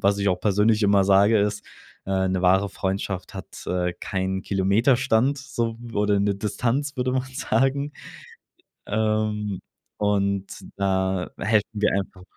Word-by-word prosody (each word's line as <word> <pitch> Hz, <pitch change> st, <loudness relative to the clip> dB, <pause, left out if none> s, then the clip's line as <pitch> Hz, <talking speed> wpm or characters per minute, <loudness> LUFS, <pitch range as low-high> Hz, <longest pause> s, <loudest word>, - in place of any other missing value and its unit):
was 100 Hz, +1 st, +3 dB
ich 100 Hz, -1 st, +2 dB
auch 90 Hz, -1 st, -1 dB
persönlich 105 Hz, +2 st, +2 dB
immer 100 Hz, -1 st, +4 dB
sage, 100 Hz, +3 st, +5 dB
ist, 105 Hz, 0 st, 0 dB, 0.4 s
äh, 95 Hz, 0 st, +1 dB
'ne 95 Hz, 0 st, 0 dB
wahre 95 Hz, +2 st, +3 dB
Freundschaft 95 Hz, -1 st, -3 dB
hat, 95 Hz, -, -9 dB
äh, 90 Hz, -1 st, 0 dB
keinen 95 Hz, 0 st, -2 dB
Kilometerstand 115 Hz, +7 st, +2 dB
so 125 Hz, -5 st, -3 dB
w 120 Hz, -1 st, -10 dB
oder 105 Hz, 0 st, +2 dB
'ne 100 Hz, 0 st, +1 dB
Distanz, 120 Hz, +8 st, -2 dB
würde 125 Hz, 0 st, 0 dB
man 130 Hz, 0 st, +1 dB
sagen. 135 Hz, +3 st, 0 dB, 0.9 s
Ähm, 105 Hz, -2 st, -1 dB, 0.4 s
und 100 Hz, -1 st, +1 dB, 0.3 s
da 95 Hz, -1 st, 0 dB
helfen 105 Hz, +1 st, +2 dB, 0.2 s
wir 105 Hz, -, +3 dB
einfach 95 Hz, -1 st, -4 dB
100 Hz, 140 wpm, -24 LUFS, 95-115 Hz, 0.9 s, sage